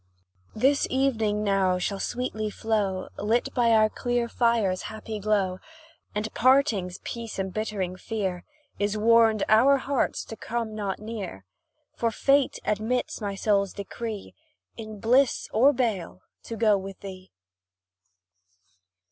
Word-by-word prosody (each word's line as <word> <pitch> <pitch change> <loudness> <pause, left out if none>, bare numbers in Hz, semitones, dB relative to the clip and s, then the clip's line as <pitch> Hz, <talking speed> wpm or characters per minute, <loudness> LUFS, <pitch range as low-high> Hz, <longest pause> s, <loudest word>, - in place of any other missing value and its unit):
This 270 +6 +3
evening 225 -6 +1
now 195 -3 +2
shall 195 +2 -2
sweetly 220 -3 -2
flow, 205 -3 -1
Lit 225 +4 0
by 240 -2 +3
our 220 -1 +5
clear 240 +2 -1
fire's 230 -6 +1
happy 220 0 -6
glow; 195 -3 0 0.6
And 210 +1 -3
parting's 235 -9 +3
peace 230 -2 -6
embittering 190 -1 -3
fear, 190 -4 -3 0.4
Is 205 +1 0
warned 225 -1 +4
our 255 +6 +6
hearts 275 0 -1
to 225 - -8
come 230 -1 -4
not 205 -3 -3
near; 210 - -7 0.5
For 230 - +1
fate 275 +4 +2
admits 220 +4 -1
my 200 -1 -3
soul's 200 -1 +1
decree, 210 +1 -6 0.4
In 215 -2 -8
bliss 250 +5 +3
or 255 +6 +6
bale 220 -9 -2 0.2
to 230 - -5
go 215 -2 +3
with 195 0 -9
thee! 190 -1 -9
215 Hz, 125 wpm, -26 LUFS, 200-235 Hz, 0.6 s, our